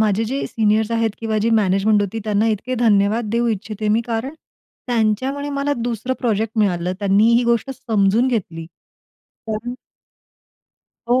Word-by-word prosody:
माझे 215 0 +2
जे 270 +5 -2
सीनियर्स 220 0 +1
आहेत 230 -1 +1
किंवा 220 -1 -1
जी 225 +2 +1
मॅनेजमेंट 205 +1 +2
होती 205 +3 -3
त्यांना 210 +1 +1
इतके 220 +4 -2
धन्यवाद 220 -1 +2
देऊ 235 +1 +1
इच्छिते 215 0 -3
मी, 220 +2 +3
कारण 235 +6 -3 0.5
त्यांच्यामुळे 250 +5 0
मला 285 +1 0
दुसरं 240 +2 -2
प्रोजेक्ट 225 -1 -1
मिळालं. 180 -4 +1
त्यांनी 205 +3 +3
ही 240 +1 +3
गोष्ट 235 +3 +1
समजून 225 0 +1
घेतली. 170 -9 -3 0.8
कारण 225 +3 -4 1.3
हो, 250 +2 +3
220 Hz, 145 wpm, -20 LUFS, 210-235 Hz, 1.3 s, मी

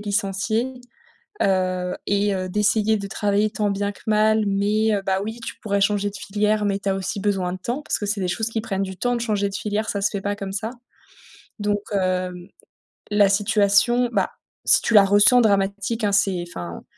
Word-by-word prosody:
licencier, 210 +4 -1 0.7
heu, 185 -1 0
et 200 0 +1
heu, 185 0 -3
d'essayer 215 +2 +2
de 200 - -5
travailler 205 +1 0
tant 210 -1 -1
bien 200 +1 -1
que - - -17
mal 215 0 +3
mais 210 +2 +1
heu, 200 - -1
bah, 190 0 0
oui, 225 +2 -6
tu - - -6
pourrais 200 -2 -1
changer 205 0 +1
de 200 - -12
filière, 210 +1 0
mais 200 0 0
tu 195 - -2
as 190 - +1
aussi 195 +2 -3
besoin 190 -3 -1
de - - -5
temps, 245 +9 -3
parce - - -2
que 205 - -3
c'est 205 -1 -1
des 180 - 0
choses 220 +4 -2
qui 225 -1 -2
prennent 195 -3 -3
du 190 -1 -6
temps 245 0 0
de 235 - -2
changer 205 -3 0
de 195 - -7
filière. 215 +1 -2
Ça 200 - -2
se 200 - +2
fait 200 -2 -3
pas 205 0 -2
comme 195 -1 -6
ça, 220 +3 -3 0.9
donc 205 0 0
hem, 185 -1 -1 0.6
la 205 -1 +4
situation, 210 +4 +3
bah, 195 -3 +1 0.3
si - - +5
tu 230 - -1
la 205 -2 +8
ressens 205 +5 +5
dramatique, 200 +2 0
hein, 205 - +2
c'est 195 -3 +1
enfin, 85 - -7
205 Hz, 210 wpm, -22 LUFS, 195-215 Hz, 0.9 s, la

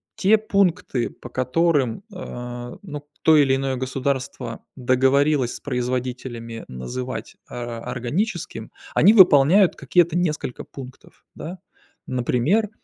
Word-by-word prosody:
те 210 +3 +4
пункты, 195 - 0
по 125 - -12
которым, 135 - +1
а, 120 -7 -7
ну, 150 -5 -7 0.2
то 160 -1 +6
или 135 -2 +4
иное 135 0 -1
государство 130 +1 -3
договорилось 130 +1 +2
с - - -8
производителями 125 -3 -4
называть, 115 - -6
а, 120 -1 -5
органическим, 125 - -3 0.2
они 205 +7 +6
выполняют 180 0 +6
какие-то 175 -1 +2
несколько 155 -7 -2
пунктов, 130 -1 -12
да. 180 +3 -7 0.5
Например, 130 - +1
135 Hz, 110 wpm, -23 LUFS, 125-170 Hz, 0.5 s, то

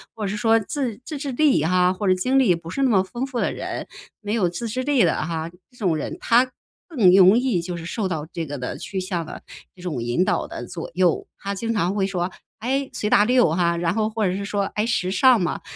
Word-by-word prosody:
或 220 - -5
者 - - -1
是 205 - -3
说 225 +1 +3
自 235 0 -3
自 305 - -5
制 280 -1 -4
力 285 - +3
啊， 180 +3 +3
或 195 +2 -3
者 185 - +5
经 255 +9 +2
历 225 -10 +4
不 165 0 -9
是 275 - -3
那 265 - +3
么 195 -5 +4
丰 240 +7 -4
富 260 -3 -4
的 - - 0
人， - - -5 0.3
没 210 -1 -3
有 210 -6 +2
自 175 +7 -5
制 255 +4 -2
力 275 -3 +3
的 170 - +2
哈， 165 0 -3 0.2
这 250 - -23
种 185 -8 +1
人， 150 - -4
他 245 +2 +3 0.4
更 235 - +4
容 190 +3 +7
易 245 -8 +1
就 175 +1 -5
是 165 - -8
受 200 +4 -2
到 160 -5 -3
这 165 - -4
个 145 -1 -6
的 125 -1 -5
趋 195 - -5
向 180 -3 -3
的 - - -9 0.3
这 180 - -15
种 160 -9 -3
引 120 +9 +1
导 - - 0
的 - - -7
左 165 - -7
右。 180 -1 +1
他 200 0 -3
经 230 +3 -2
常 190 -2 0
会 195 -2 +1
说， 180 -2 -2 0.3
诶， 270 +4 -1
随 210 - -2
大 205 - +5
流 245 -5 +3
哈， 170 -1 +1
然 170 0 0
后 215 +1 0
或 220 -1 -1
者 180 - -1
是 200 - -4
说， 200 0 -1
诶 210 - +1
时 185 -6 0
尚 235 +6 +5
嘛， 175 - -2
195 Hz, 275 characters per minute, -23 LUFS, 175-235 Hz, 0.4 s, 容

